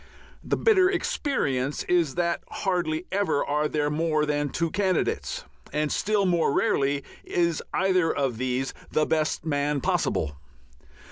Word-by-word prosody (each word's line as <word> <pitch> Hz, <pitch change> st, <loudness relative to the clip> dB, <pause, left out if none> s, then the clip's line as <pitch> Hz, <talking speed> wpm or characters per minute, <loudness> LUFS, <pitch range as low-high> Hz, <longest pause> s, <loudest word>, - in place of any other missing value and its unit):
The -, -, 0 dB
bitter 380 Hz, -5 st, +4 dB
experience 145 Hz, -, -1 dB
is 170 Hz, -6 st, +1 dB
that 170 Hz, -1 st, 0 dB
hardly 175 Hz, -3 st, -1 dB
ever 195 Hz, -7 st, +1 dB
are 150 Hz, +1 st, +1 dB
there 150 Hz, -1 st, 0 dB
more 155 Hz, 0 st, +1 dB
than 145 Hz, -1 st, 0 dB
two 165 Hz, +3 st, -1 dB
candidates, 190 Hz, -3 st, 0 dB, 0.3 s
and 150 Hz, 0 st, 0 dB
still 210 Hz, -1 st, +1 dB
more 170 Hz, -5 st, +2 dB
rarely 140 Hz, 0 st, +1 dB, 0.2 s
is 170 Hz, -2 st, 0 dB
either 185 Hz, -3 st, +2 dB
of 135 Hz, -5 st, -1 dB
these 130 Hz, +1 st, -1 dB, 0.2 s
the 155 Hz, -, +2 dB
best 155 Hz, 0 st, 0 dB
man 145 Hz, -1 st, 0 dB
possible. 75 Hz, -, 0 dB
155 Hz, 135 wpm, -26 LUFS, 145-180 Hz, 0.3 s, bitter